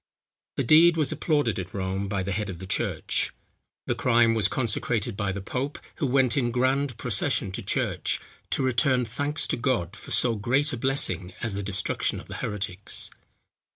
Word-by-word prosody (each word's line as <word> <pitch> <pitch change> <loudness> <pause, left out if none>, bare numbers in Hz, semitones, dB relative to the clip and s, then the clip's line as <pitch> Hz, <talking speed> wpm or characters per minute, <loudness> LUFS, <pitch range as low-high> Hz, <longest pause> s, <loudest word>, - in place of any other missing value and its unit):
The - - +1
deed 165 +6 +6
was 155 -2 +2
applauded 145 - +1
at 90 +1 -6
Rome, 95 +1 -2
by 100 -2 -1
the 100 - -3
head 105 +1 -2
of 90 - -5
the 95 - -8
church. 95 - -1 0.5
The - - +1
crime 115 -2 +3
was 110 -3 +4
consecrated 115 -1 -1
by 100 -2 -1
the 100 +1 -4
pope, 135 +8 -3 0.2
who 150 - 0
went 130 -1 +3
in 125 -4 +1
grand 130 +1 +1
procession 120 -2 +1
to 95 - -5
church, - - 0 0.3
to - - +1
return 130 0 +3
thanks 145 +5 -2
to - - -1
God 115 -7 0
for - - -11
so 120 - +2
great 130 +8 +1
a - - -2
blessing 95 - +1
as 115 -3 -1
the 100 - -3
destruction 100 -1 -1
of - - -12
the - - -7
heretics. 100 -1 -2
115 Hz, 185 wpm, -26 LUFS, 100-135 Hz, 0.5 s, deed